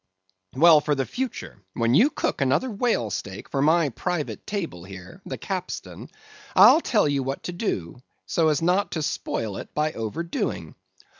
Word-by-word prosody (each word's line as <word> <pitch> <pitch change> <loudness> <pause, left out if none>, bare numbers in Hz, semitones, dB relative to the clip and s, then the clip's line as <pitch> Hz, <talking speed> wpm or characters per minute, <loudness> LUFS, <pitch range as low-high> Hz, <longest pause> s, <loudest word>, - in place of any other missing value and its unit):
Well, 155 +2 +7
for 150 0 0
the 135 -1 -1
future, 245 - -5
when 115 0 +1
you 235 - +6
cook - - -2
another 140 - +1
whale 205 - 0
steak 95 +1 -6
for 135 - -2
my 160 +1 +3
private 170 +4 -4
table 170 - -4
here, 95 -1 -11
the - - -5
capstan, - - -6 0.5
I'll 240 - +8
tell 215 - +2
you 140 -1 0
what 135 +1 -4
to - - -4
do 125 - -4 0.2
so 165 -2 +1
as 155 0 +1
not 185 +4 +2
to 160 - -2
spoil 110 -7 -3
it - - -9
by 155 0 0
overdoing. 160 +10 -4
150 Hz, 165 wpm, -24 LUFS, 120-180 Hz, 0.5 s, I'll